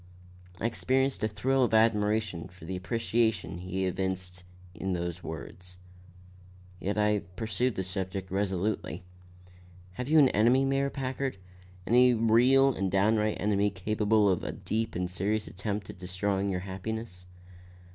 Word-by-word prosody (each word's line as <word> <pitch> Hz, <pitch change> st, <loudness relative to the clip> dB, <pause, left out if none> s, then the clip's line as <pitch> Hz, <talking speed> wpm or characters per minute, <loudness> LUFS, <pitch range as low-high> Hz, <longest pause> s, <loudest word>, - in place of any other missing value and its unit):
I -, -, -3 dB
experienced 130 Hz, +1 st, 0 dB
a -, -, +3 dB
thrill 130 Hz, +5 st, +1 dB
of 115 Hz, -2 st, +2 dB
admiration 105 Hz, -5 st, +2 dB
for 90 Hz, -2 st, -14 dB
the 95 Hz, +3 st, -4 dB
appreciation 110 Hz, 0 st, 0 dB
he 95 Hz, +1 st, -2 dB
evinced 90 Hz, -1 st, -2 dB, 0.3 s
in 95 Hz, +2 st, -3 dB
those 85 Hz, 0 st, -3 dB
words. 90 Hz, +3 st, -8 dB, 1.0 s
Yet 100 Hz, +3 st, -2 dB
I 105 Hz, 0 st, +3 dB, 0.2 s
pursued 115 Hz, +2 st, -1 dB
the 95 Hz, -, -2 dB
subject 95 Hz, 0 st, -4 dB
resolutely. 95 Hz, -2 st, -1 dB, 0.9 s
"Have 125 Hz, +8 st, -5 dB
you 160 Hz, -, +5 dB
an 140 Hz, -4 st, +7 dB
enemy, 120 Hz, +6 st, +4 dB
Mayor 135 Hz, +1 st, +1 dB
Packard? 135 Hz, -3 st, -3 dB, 0.5 s
Any 125 Hz, +1 st, +5 dB
real 125 Hz, +5 st, +5 dB
and 95 Hz, -3 st, -1 dB
downright 105 Hz, +2 st, +2 dB
enemy 105 Hz, 0 st, +2 dB
capable 105 Hz, +2 st, +1 dB
of 95 Hz, -3 st, +1 dB
a -, -, -3 dB
deep 110 Hz, +1 st, -3 dB
and 90 Hz, +1 st, -1 dB
serious 100 Hz, +4 st, -1 dB
attempt 100 Hz, +1 st, -4 dB
at -, -, -16 dB
destroying 95 Hz, +2 st, -1 dB
your 90 Hz, -1 st, -2 dB
happiness?" 95 Hz, 0 st, -6 dB
105 Hz, 140 wpm, -29 LUFS, 95-115 Hz, 1.0 s, an